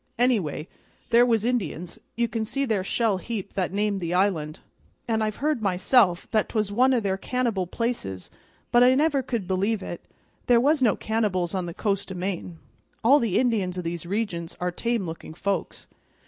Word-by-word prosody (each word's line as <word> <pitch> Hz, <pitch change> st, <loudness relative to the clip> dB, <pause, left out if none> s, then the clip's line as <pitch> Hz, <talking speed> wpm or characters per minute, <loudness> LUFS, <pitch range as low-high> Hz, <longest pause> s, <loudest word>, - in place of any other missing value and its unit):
"Anyway, 205 Hz, -, +1 dB, 0.4 s
there 240 Hz, +1 st, +6 dB
was 225 Hz, -2 st, +2 dB
Indians 195 Hz, -8 st, -2 dB, 0.2 s
you 235 Hz, 0 st, +1 dB
can 225 Hz, -1 st, -2 dB
see 275 Hz, +6 st, -1 dB
their 215 Hz, -6 st, 0 dB
shell 215 Hz, 0 st, +1 dB
heap 200 Hz, 0 st, -5 dB
that 185 Hz, -3 st, -1 dB
named 205 Hz, 0 st, 0 dB
the 175 Hz, -1 st, -2 dB
island; 175 Hz, -5 st, 0 dB, 0.5 s
and 220 Hz, -2 st, +1 dB
I've 215 Hz, -1 st, -1 dB
heard 300 Hz, -4 st, -1 dB
myself 190 Hz, 0 st, +3 dB
that 215 Hz, -2 st, +1 dB
'twas 215 Hz, -3 st, -1 dB
one 255 Hz, +5 st, +4 dB
o' -, -, +3 dB
their 195 Hz, -3 st, -1 dB
cannibal 235 Hz, -8 st, -1 dB
places, 180 Hz, -, -3 dB, 0.4 s
but 240 Hz, -, +5 dB
I 250 Hz, +1 st, +6 dB
never 290 Hz, -1 st, +2 dB
could 235 Hz, -7 st, -3 dB
believe 195 Hz, +3 st, 0 dB
it. 175 Hz, -, -7 dB, 0.4 s
There 245 Hz, -, +6 dB
never 235 Hz, -, +2 dB
was 300 Hz, -1 st, +3 dB
no 230 Hz, -5 st, +4 dB
cannibals 205 Hz, -6 st, -1 dB
on 185 Hz, -2 st, -2 dB
the 170 Hz, -, -7 dB
coast 200 Hz, -2 st, -1 dB
o' -, -, -5 dB
Maine. 180 Hz, -2 st, -4 dB, 0.5 s
All 275 Hz, +6 st, +6 dB
the 225 Hz, -8 st, 0 dB
Indians 205 Hz, -8 st, +1 dB
o' 180 Hz, -, -3 dB
these 170 Hz, 0 st, -4 dB
regions 185 Hz, -5 st, -3 dB
are 180 Hz, 0 st, -1 dB
tame 230 Hz, +2 st, -1 dB
looking 160 Hz, -1 st, -8 dB
folks." 195 Hz, -1 st, -3 dB
205 Hz, 190 wpm, -25 LUFS, 180-235 Hz, 0.5 s, there